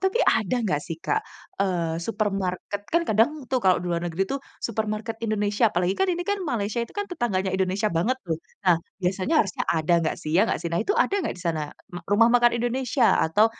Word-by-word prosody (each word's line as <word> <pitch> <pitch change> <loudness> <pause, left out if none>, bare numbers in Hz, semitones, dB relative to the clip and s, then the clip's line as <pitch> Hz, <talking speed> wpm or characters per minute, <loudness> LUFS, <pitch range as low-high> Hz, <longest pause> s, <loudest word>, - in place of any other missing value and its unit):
Tapi 380 +4 +1
ada 220 +1 +2
enggak 150 -9 0
sih, 165 -2 -4
Kak, 430 - 0 0.4
eee, 170 -4 0
supermarket? 200 -1 -2
Kan 335 0 +4
kadang 225 +6 +4 0.2
tuh 260 - +2
kalau 185 -1 +4
di - - -5
luar 170 - 0
negeri 175 +2 -1
tuh 275 - -2 0.3
supermarket 220 0 -3
Indonesia, 210 0 +2
apalagi 180 +2 +1
kan 385 - +2
ini 350 0 -1
kan 405 0 0
Malaysia, 225 -3 -1
itu 235 - -7
kan 410 - -1
tetangganya 195 - -1
Indonesia 190 +2 0
banget 190 +11 +1
loh. 160 -1 -1 0.3
Nah, 175 -2 +6 0.3
biasanya 185 - 0
harusnya 195 - -4
ada 160 +1 +1
enggak 160 - -1
sih, 155 - -6
ya, 185 - +6
enggak - - 0
sih? 170 - -2
Nah, 170 - 0
itu 405 - 0
ada - - +2
enggak - - -2
di - - -10
sana 160 -2 0 0.3
ru 175 - -5
rumah 230 +3 +6
makan 240 0 +5
Indonesia 245 0 +1 0.2
atau, 205 +7 +4
205 Hz, 210 wpm, -25 LUFS, 180-240 Hz, 0.4 s, Nah